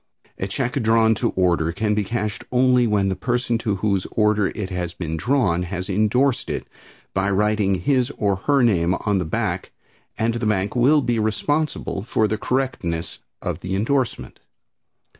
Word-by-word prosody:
A 95 Hz, -, -2 dB
check 125 Hz, +5 st, -2 dB
drawn 110 Hz, 0 st, +4 dB
to 105 Hz, -, 0 dB
order 85 Hz, -3 st, +2 dB
can 105 Hz, +4 st, 0 dB
be 105 Hz, 0 st, +1 dB
cashed 105 Hz, -1 st, -3 dB
only 125 Hz, -1 st, +4 dB
when 100 Hz, -2 st, +2 dB
the 95 Hz, -, -1 dB
person 120 Hz, +3 st, -1 dB
to 105 Hz, -3 st, -1 dB
whose 100 Hz, -1 st, 0 dB
order 105 Hz, -2 st, +2 dB
it 95 Hz, -3 st, -4 dB
has 90 Hz, -2 st, -3 dB
been 80 Hz, -3 st, -4 dB
drawn 100 Hz, -, +1 dB
has 90 Hz, +2 st, -4 dB
indorsed 110 Hz, +7 st, +1 dB
it -, -, -3 dB, 0.5 s
by 95 Hz, +1 st, +1 dB
writing 105 Hz, 0 st, +2 dB
his 125 Hz, -, +1 dB
or 100 Hz, -2 st, +1 dB
her 140 Hz, +6 st, +2 dB
name 90 Hz, -6 st, +3 dB
on 100 Hz, +1 st, 0 dB
the 90 Hz, -, -2 dB
back 95 Hz, 0 st, -2 dB, 0.5 s
and 115 Hz, +1 st, +1 dB
the 115 Hz, -1 st, -2 dB
bank 100 Hz, 0 st, 0 dB
will 140 Hz, +5 st, +4 dB
be 120 Hz, -3 st, 0 dB
responsible 110 Hz, +3 st, -1 dB
for 110 Hz, 0 st, +1 dB
the 110 Hz, 0 st, -2 dB
correctness 125 Hz, -12 st, -2 dB, 0.2 s
of -, -, -3 dB
the 95 Hz, +1 st, -3 dB
indorsement. 125 Hz, +5 st, -1 dB
105 Hz, 170 wpm, -22 LUFS, 95-120 Hz, 0.5 s, drawn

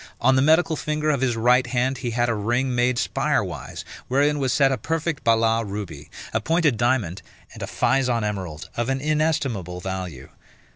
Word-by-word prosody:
On 130 Hz, +2 st, +4 dB
the 130 Hz, -, +4 dB
medical 160 Hz, +3 st, +4 dB
finger 150 Hz, 0 st, -1 dB
of 140 Hz, -3 st, -1 dB
his 125 Hz, -3 st, +1 dB
right 125 Hz, +2 st, +3 dB
hand 130 Hz, +1 st, 0 dB
he 125 Hz, -, -3 dB
had 120 Hz, +1 st, 0 dB
a 120 Hz, -, +1 dB
ring 120 Hz, +5 st, 0 dB
made 125 Hz, 0 st, +2 dB
spire -, -, +1 dB
wise, -, -, -7 dB, 0.2 s
wherein 145 Hz, +3 st, +2 dB
was 130 Hz, -2 st, 0 dB
set 135 Hz, 0 st, +3 dB
a 135 Hz, -, 0 dB
perfect 160 Hz, +3 st, -2 dB
Balas 115 Hz, 0 st, +3 dB
ruby, 100 Hz, -1 st, -6 dB, 0.2 s
a 110 Hz, -, +1 dB
pointed 160 Hz, 0 st, +2 dB
diamond, 110 Hz, -6 st, 0 dB, 0.3 s
and -, -, -11 dB
a -, -, -3 dB
Physon 125 Hz, -4 st, +1 dB
emerald, 95 Hz, -7 st, -4 dB
of 120 Hz, +2 st, -1 dB
an 135 Hz, 0 st, 0 dB
inestimable 145 Hz, -, -1 dB
value. 90 Hz, -8 st, -6 dB
125 Hz, 185 wpm, -23 LUFS, 110-140 Hz, 0.3 s, On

